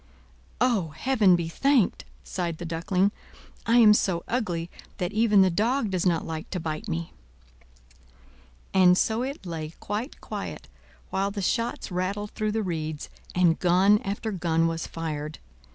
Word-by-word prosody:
"O, 230 -8 +2
Heaven 215 -5 +4
be 170 -1 -2
thanked!" 260 - +2 0.2
sighed 170 -3 -3
the 175 - -6
Duckling. 180 +4 +1 0.6
"I 230 +1 +5
am 220 -3 +8
so 180 -5 +1
ugly, 180 -9 -1 0.3
that 180 0 -2
even 210 -2 +5
the 185 - +3
dog 225 +4 +1
does 185 0 +1
not 170 -2 +1
like 160 -1 -5
to 185 - -3
bite 155 -2 -4
me!" 80 +1 -4 1.6
And 180 -1 +6
so 220 +4 +1
it 270 -4 -5
lay 160 -2 -5
quite 215 +7 -4
quiet, - - -6 0.4
while 195 +1 0
the 200 -1 -4
shots 230 +1 -1
rattled 195 +3 -2
through 215 -1 -2
the 220 0 0
reeds 155 -4 -4 0.3
and 175 -2 +3
gun 190 +4 +4
after 205 +3 -3
gun 165 -3 +1
was 165 0 -2
fired. 155 -2 -5
185 Hz, 150 wpm, -26 LUFS, 165-215 Hz, 1.6 s, am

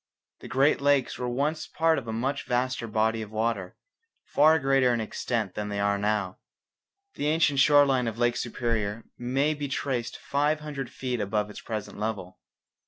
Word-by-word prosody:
The - - -10
Great 135 +2 +2
Lakes 140 -2 +2
were 125 -1 -2
once 145 +6 -1
part 160 -1 +2
of 120 - -12
a - - -2
much 130 +5 -2
vaster 125 -1 -1
body 110 +1 +1
of 110 - -7
water, 110 -3 -2 0.5
far 155 +2 +4
greater 135 -3 +3
in - - -2
extent 110 -2 -2
than 105 0 -4
they 100 - -3
now 100 - +1
are. 100 -2 0 0.8
The 145 - -2
ancient 150 -3 +2
shore 145 +1 +6
line 130 -3 +1
of 115 -1 -4
Lake 120 0 +2
Superior 115 -3 -2 0.2
may 135 +5 +1
be 145 -1 -4
traced 130 -3 -2
five 150 +2 0
hundred 140 -4 -5
feet 125 -2 -3
above 105 +1 -1
its - - -9
present 110 -2 -5
level. 105 - -4
120 Hz, 175 wpm, -27 LUFS, 110-140 Hz, 0.8 s, shore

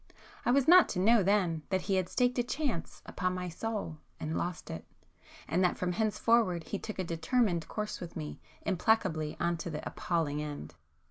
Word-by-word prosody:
I - - +4
was 270 +1 +4
not 360 +1 +8
to - - -2
know 220 +4 +5
then 185 -5 +2
that 190 -1 +1
he 195 - -1
had 185 -2 0
staked 250 0 +1
a - - +3
chance 260 - -3
upon 185 0 -2
my 180 0 -3
soul 185 -3 -4 0.2
and 155 +1 -3
lost 175 -1 -3
it,—and 165 - -5
that 180 - +2
from 180 -1 -1
henceforward 215 -2 +2
he 200 - -4
took 215 - -6
a 190 - -1
[p 170 - -3
295] - - -9
determined 175 -5 +2
course 210 -1 -4
with 175 -2 -8
me, 155 -2 -5 0.2
implacably 180 -6 +1
on 170 0 +1
to 165 - -5
the 155 -2 -5
appalling 155 -4 -1
end. 145 - -6
180 Hz, 195 wpm, -31 LUFS, 165-220 Hz, 0.2 s, not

